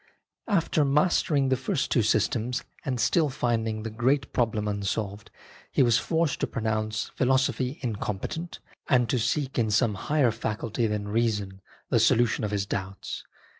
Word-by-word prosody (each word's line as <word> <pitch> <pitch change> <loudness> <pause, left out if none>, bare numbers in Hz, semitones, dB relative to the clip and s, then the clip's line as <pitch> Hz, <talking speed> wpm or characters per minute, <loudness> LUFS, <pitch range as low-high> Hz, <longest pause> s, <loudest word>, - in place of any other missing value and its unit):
After 170 -7 +2
mastering 145 -1 +2
the 130 - +3
first 135 +2 -2
two 120 - +4
systems 110 +3 +1 0.2
and 130 -3 -2
still 155 +4 +3
finding 115 -4 -1
the 115 - -4
great 130 +5 0
problem 110 -3 0
unsolved, 100 0 -3 0.4
he - - +4
was 120 -1 +4
forced 160 -4 0
to - - 0
pronounce 110 -1 -2
philosophy 130 +1 +1
incompetent, 115 - -4 0.3
and 125 -4 +4
to 125 - +1
seek 135 +3 0
in 110 -2 +2
some 110 +1 +2
higher 140 +4 +1
faculty 110 +1 -2
than 105 -1 -2
reason 105 -4 -1 0.3
the - - +4
solution 120 -1 +3
of 105 - 0
his 100 -1 -1
doubts. 95 0 -5
115 Hz, 150 wpm, -27 LUFS, 105-135 Hz, 0.4 s, two